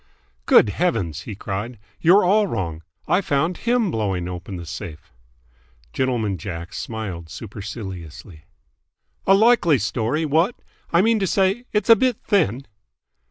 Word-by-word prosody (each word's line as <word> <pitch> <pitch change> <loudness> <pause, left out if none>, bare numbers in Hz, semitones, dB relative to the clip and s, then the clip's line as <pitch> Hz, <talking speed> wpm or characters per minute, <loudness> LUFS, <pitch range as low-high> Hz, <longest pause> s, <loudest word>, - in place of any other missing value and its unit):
"Good - - +6
Heavens!" 115 - -1
he 105 - -5
cried. 105 +4 -5 0.2
"You're 185 +4 +5
all 205 +3 +3
wrong. 85 - -3 0.3
I 185 - +3
found 165 +1 0
him 235 -5 +1
blowing 95 -5 -1
open 90 +2 -6
the 85 -1 -7
safe!" 80 -3 -8 0.8
Gentleman 115 -8 -1
Jack 85 -1 -6
smiled 95 -8 -5
superciliously. 95 -6 -8 0.8
"A 195 - +7
likely 210 - +4
story, 120 +8 -1
what! 165 - +2 0.4
I 170 +2 +4
mean 225 0 +3
to 195 - 0
say, 195 +6 +1
it's 210 -2 0
a - - +10
bit 250 +1 +1
thin!" 140 - +1
120 Hz, 135 wpm, -22 LUFS, -, 0.8 s, a